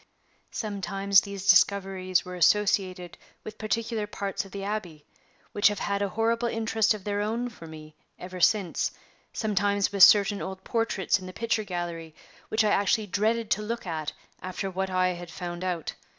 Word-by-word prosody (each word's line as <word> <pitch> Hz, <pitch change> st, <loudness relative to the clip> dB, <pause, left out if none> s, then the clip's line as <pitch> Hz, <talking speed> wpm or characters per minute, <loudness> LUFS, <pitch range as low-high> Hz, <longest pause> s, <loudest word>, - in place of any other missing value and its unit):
Sometimes 200 Hz, -2 st, +1 dB
these 200 Hz, -1 st, -7 dB
discoveries 190 Hz, -1 st, +3 dB
were 180 Hz, -, -7 dB
associated 185 Hz, -1 st, +1 dB, 0.2 s
with 215 Hz, 0 st, -9 dB
particular 220 Hz, 0 st, -2 dB
parts 200 Hz, -1 st, -3 dB
of 195 Hz, -, -14 dB
the 200 Hz, -1 st, -6 dB
Abbey, 185 Hz, -8 st, -5 dB, 0.5 s
which 205 Hz, -, +4 dB
have 205 Hz, 0 st, 0 dB
had 200 Hz, 0 st, -2 dB
a 200 Hz, -, 0 dB
horrible 230 Hz, +3 st, 0 dB
interest 225 Hz, -1 st, +1 dB
of 205 Hz, -, -10 dB
their 205 Hz, 0 st, -1 dB
own 230 Hz, +4 st, -2 dB
for 170 Hz, -8 st, -12 dB
me 155 Hz, -1 st, -11 dB, 0.2 s
ever 185 Hz, 0 st, -8 dB
since; 195 Hz, -2 st, +2 dB, 0.4 s
sometimes 205 Hz, -2 st, 0 dB
with 200 Hz, -1 st, -2 dB
certain 200 Hz, +1 st, +7 dB
old 190 Hz, 0 st, -6 dB
portraits 225 Hz, -4 st, 0 dB
in 185 Hz, -, -9 dB
the 185 Hz, -, -8 dB
picture 230 Hz, 0 st, -1 dB
gallery, 170 Hz, -4 st, -5 dB, 0.3 s
which 220 Hz, 0 st, +2 dB
I 210 Hz, -, +2 dB
actually 205 Hz, +2 st, +2 dB
dreaded 215 Hz, +3 st, 0 dB
to 210 Hz, -, +2 dB
look 230 Hz, +2 st, -4 dB
at 160 Hz, -4 st, -3 dB, 0.3 s
after 185 Hz, +1 st, -4 dB
what 190 Hz, +1 st, -2 dB
I 185 Hz, 0 st, +2 dB
had 175 Hz, -1 st, -6 dB
found 175 Hz, 0 st, -6 dB
out. 175 Hz, -4 st, -3 dB
200 Hz, 170 wpm, -27 LUFS, 185-215 Hz, 0.5 s, certain